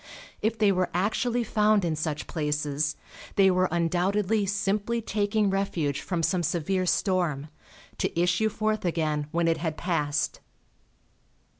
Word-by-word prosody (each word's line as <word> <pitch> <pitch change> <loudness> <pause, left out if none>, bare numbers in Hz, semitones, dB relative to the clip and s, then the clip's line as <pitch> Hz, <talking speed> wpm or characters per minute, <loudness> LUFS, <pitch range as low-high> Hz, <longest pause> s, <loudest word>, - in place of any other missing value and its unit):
If 220 +1 0
they 210 -2 +4
were 185 -1 +1
actually 235 +6 +1
found 210 -3 +2
in 160 -2 0
such 155 -1 -3
places 150 -1 -1 0.4
they 195 -1 +5
were 185 0 +2
undoubtedly 190 +5 +1
simply 205 +3 0
taking 210 -1 0
refuge 170 -8 -1
from 175 -3 -2
some 180 +1 +1
severe 175 +3 0
storm, 170 -7 0 0.5
to - - -1
issue 180 +5 +2
forth 215 0 -1
again 155 -4 -1
when 170 +1 0
it 165 -1 +2
had 155 -1 -3
passed. 150 -5 -1
180 Hz, 135 wpm, -27 LUFS, 160-205 Hz, 0.5 s, they